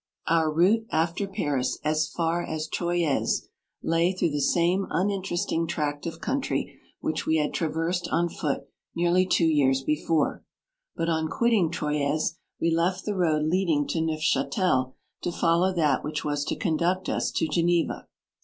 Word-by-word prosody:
Our 160 -1 +2
route 200 +8 +3
after 170 +5 0
Paris, 145 -10 -1
as 155 0 +1
far 170 +1 -1
asTroyes, 160 0 -1 0.3
lay 165 +2 +2
through 175 -3 0
the 145 0 -1
same 175 +6 +2
uninteresting 185 -3 -1
tract 150 -1 -2
of 165 0 -6
country 270 - -2 0.2
which 315 - -2
we 160 - +3
had 150 -1 0
tra 165 - 0
versed 165 +3 -1
on 175 +1 +1
foot 150 -3 -3 0.3
nearly 175 +2 +3
two 170 - +3
years 135 -4 +3
before, 150 +2 0 0.5
but 165 - -1
on 160 -1 +1
quitting 220 -3 +2
Troyes 150 0 -1 0.2
we 165 - +1
left 175 +3 0
the 210 - -1
road 160 -5 +2
leading 160 -3 +1
to 165 - 0
NeuftMtel, 155 -3 +1 0.3
to 175 - -2
follow 170 +2 +2
that 155 -7 +1
which 150 0 -3
w - - -3
r - - 0
as 145 0 -1
to - - -2
conduct 175 +1 0
us - - 0
to 160 - +1
Ge 155 +2 0
neva. 170 -1 0
165 Hz, 165 wpm, -26 LUFS, 155-175 Hz, 0.5 s, route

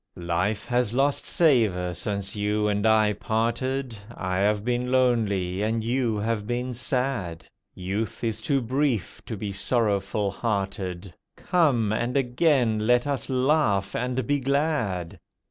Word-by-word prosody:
Life 90 +5 -1
has 120 -2 0
lost 140 +2 +1
savour 110 - +2
since 100 +3 -3
you 105 +1 0
and 105 +1 +1
I 110 -1 +4
parted; 120 +4 -1 0.2
I 95 0 -2
have 105 +1 +1
been 125 0 -1
lonely, 105 -8 +1
and 110 +1 0
you 120 -1 0
have 105 0 -2
been 125 +1 -2
sad. 120 -9 -2 0.3
Youth 100 +6 -4
is 115 -2 -2
too 140 -2 +1
brief 120 - -1
to 110 - -4
be 100 0 -4
sorrowful 100 -1 0
hearted— 95 -4 -3 0.2
Come! 140 - +2
and 120 +4 -1
again 125 -3 +2
let 125 +1 +4
us 140 -1 -2
laugh 130 -7 +1
and 125 0 -1
be 145 +3 +1
glad. 135 - -1
110 Hz, 135 wpm, -25 LUFS, 100-125 Hz, 0.3 s, I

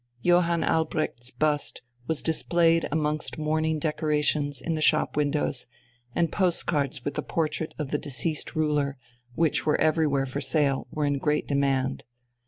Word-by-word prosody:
Johann 175 -1 +3
Albrecht's 155 -6 -1
bust 150 -1 0 0.2
was 160 -2 0
displayed 165 0 +2
amongst 150 0 -1
mourning 155 +1 0
decorations 150 -2 0
in 165 +6 -2
the 155 - -2
shop 155 0 +3
windows, 145 -3 0 0.5
and 170 -1 +1
postcards 150 -8 0
with 145 - -1
the - - -2
portrait 160 -1 -2
of 150 -4 -4
the 150 - 0
deceased 145 +4 -2
ruler, 150 -3 0 0.4
which 160 -2 +2
were 150 - +2
everywhere 155 -3 +2
for 135 +2 -4
sale, 140 -4 +1
were 150 -1 -1
in 145 -1 0
great 150 +2 0
demand. 135 -2 0
150 Hz, 145 wpm, -26 LUFS, 145-160 Hz, 0.5 s, Johann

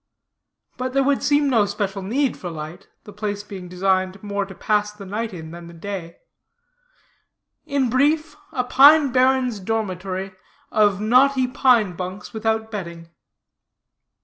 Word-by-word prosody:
But 255 0 -3
there 275 0 +3
would 280 0 +1
seem 290 0 +2
no 225 -6 +3
special 200 -1 -3
need 250 +7 0
for 180 - -7
light, 160 +3 -8 0.2
the 210 - -12
place 205 0 -4
being 190 -3 -9
designed 185 +1 0
more 200 -1 -2
to 190 - -11
pass 210 -1 0
the 210 -1 -11
night 220 +4 -3
in, 160 -4 -8
than 170 0 -10
the 170 - -12
day; 175 -1 -6 1.5
in 280 -3 +1
brief, 295 +6 +1 0.2
a 260 -6 -1
pine 280 +3 +6
barrens 255 -3 +2
dormitory, 190 -2 -3 0.4
of 205 -3 +3
knotty 255 +4 +4
pine 245 -7 +3
bunks, 185 +3 -7
without 220 0 -1
bedding. 170 -5 -7
210 Hz, 145 wpm, -22 LUFS, 190-255 Hz, 1.5 s, pine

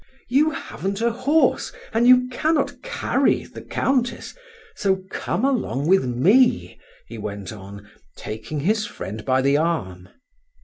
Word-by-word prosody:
You 285 +5 +4
haven't 195 -8 -5
a 235 +1 +1
horse, 275 +7 +1 0.2
and 230 +2 +3
you 250 0 +6
cannot 305 +4 0
carry - - 0
the - - -11
Countess, 255 -3 -1 0.4
so 190 -1 0
come 210 +9 -2
along 235 - -1
with 190 -4 +4
me," 190 - +3 0.3
he - - -9
went 100 -1 -6
on, 100 0 -11 0.3
taking 110 +7 -5
his 210 +6 +1
friend 105 +3 -7
by 130 +1 +1
the 140 +1 +3
arm. 95 - -2
190 Hz, 135 wpm, -22 LUFS, -, 0.4 s, you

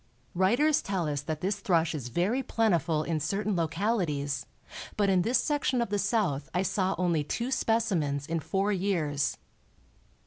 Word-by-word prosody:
Writers 245 - +3
tell 190 -5 -2
us 145 -2 -1
that 155 +1 -4
this 200 +2 -1
thrush 165 -4 +1
is 140 -6 -4
very 185 - 0
plentiful 175 - +1
in 160 -1 -1
certain 200 +6 -1
localities, 160 - -1 0.5
but 200 -2 +3
in 185 -2 +4
this 235 +8 +2
section 285 -4 0
of 235 - 0
the 205 - +1
South 200 - 0
I 180 - +2
saw 190 -1 0
only 170 -4 +1
two 235 - -3
specimens 185 - 0
in 165 +2 -1
four 190 +7 0
years. 175 -7 0
185 Hz, 160 wpm, -29 LUFS, 155-210 Hz, 0.5 s, in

